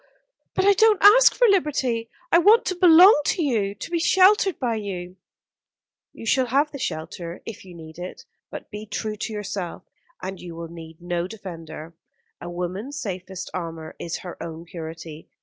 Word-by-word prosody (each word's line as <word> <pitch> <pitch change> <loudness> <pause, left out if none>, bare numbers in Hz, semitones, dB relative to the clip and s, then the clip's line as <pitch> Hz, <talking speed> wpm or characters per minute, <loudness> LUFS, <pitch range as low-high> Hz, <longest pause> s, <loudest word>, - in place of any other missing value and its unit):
But 380 - +1
I 405 - +7
don't 435 0 +4
ask 455 +5 +8
for - - +4
liberty. 270 - +1 0.2
I 340 - +6
want 425 +6 +5
to 370 - -1
belong 355 0 +7
to 340 - +1
you, 210 -8 0
to 205 - -8
be 340 - 0
sheltered 380 +1 +4
by 245 -3 -1
you." 185 -3 -6 0.9
"You - - -11
shall 255 +3 +2
have 285 +5 +1
the 280 - -8
shelter, 170 -4 -5
if 225 - -8
you 180 -2 -13
need 160 0 -12
it; 180 +1 -8 0.2
but - - -9
be 210 0 -7
true 215 +1 -4
to 220 - -4
yourself, 200 -4 -5 0.4
and 190 0 -6
you 175 -2 -9
will 165 0 -7
need 165 -1 -11
no 175 0 -2
defender. 165 -6 -9 0.5
A 175 - -6
woman's 185 +11 -5
safest 190 - -6
armour 165 -3 -6
is 170 - -4
her 175 - -8
own 165 0 -7
purity. 165 -2 -9
200 Hz, 175 wpm, -23 LUFS, -, 0.9 s, ask